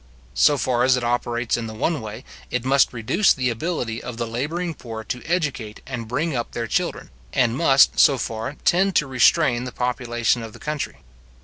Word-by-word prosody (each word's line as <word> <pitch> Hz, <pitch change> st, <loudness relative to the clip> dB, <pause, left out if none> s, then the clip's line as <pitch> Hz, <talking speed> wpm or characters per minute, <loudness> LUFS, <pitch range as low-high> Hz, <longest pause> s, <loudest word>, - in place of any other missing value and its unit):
So 145 Hz, -, +4 dB
far 125 Hz, -2 st, +1 dB
as 130 Hz, 0 st, +4 dB
it 125 Hz, -, -3 dB
operates 120 Hz, 0 st, 0 dB
in 115 Hz, -1 st, -4 dB
the 110 Hz, -, -8 dB
one 155 Hz, +5 st, -1 dB
way, 110 Hz, +3 st, -8 dB, 0.3 s
it 125 Hz, 0 st, -2 dB
must 135 Hz, 0 st, +4 dB
reduce 125 Hz, -, +2 dB
the 130 Hz, -2 st, 0 dB
ability 120 Hz, -3 st, -3 dB
of 120 Hz, -2 st, -7 dB
the 120 Hz, -, -2 dB
labouring 155 Hz, +10 st, -3 dB
poor 115 Hz, -6 st, -8 dB
to 125 Hz, +2 st, -5 dB
educate 140 Hz, -11 st, -2 dB
and 120 Hz, -4 st, -5 dB
bring 150 Hz, +6 st, -1 dB
up 120 Hz, -1 st, -3 dB
their 115 Hz, -, -2 dB
children, 175 Hz, +10 st, -2 dB, 0.2 s
and 120 Hz, -4 st, +2 dB
must, 135 Hz, -2 st, +4 dB
so 140 Hz, -, +6 dB
far, 115 Hz, +4 st, -4 dB
tend 190 Hz, +1 st, +3 dB
to 150 Hz, -, +3 dB
restrain 130 Hz, -1 st, +3 dB
the 125 Hz, -, -5 dB
population 120 Hz, -1 st, -1 dB
of 110 Hz, -1 st, -8 dB
the -, -, -13 dB
country. 150 Hz, -1 st, -4 dB
125 Hz, 195 wpm, -22 LUFS, 115-145 Hz, 0.3 s, so